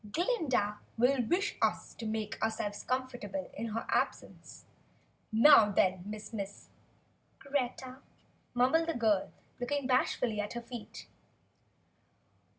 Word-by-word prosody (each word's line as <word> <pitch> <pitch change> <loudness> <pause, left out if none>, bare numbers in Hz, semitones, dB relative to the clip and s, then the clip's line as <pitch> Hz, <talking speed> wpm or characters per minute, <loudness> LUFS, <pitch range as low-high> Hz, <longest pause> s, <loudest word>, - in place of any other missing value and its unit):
"Glinda 270 - 0 0.2
will 250 +3 +3
wish 380 - +1
us - - 0
to 225 - -6
make 215 0 -3
ourselves 220 -2 -2
comfortable 255 +2 -3
in 230 - -4
her 225 +1 -3
absence. - - -3 0.7
Now 225 -1 +7
then, 185 -2 +2
Miss 215 +1 -7
Miss 200 -2 -6 0.4
?" - - -39
"Greta," 260 -1 -3 0.6
mumbled 265 +7 +3
the 330 - -1
girl, 215 -5 +2 0.3
looking 280 +3 -1
bashfully 250 -4 +1
at 205 - -5
her 240 - -4
feet. 235 -1 -9
240 Hz, 120 wpm, -32 LUFS, 215-265 Hz, 0.7 s, Now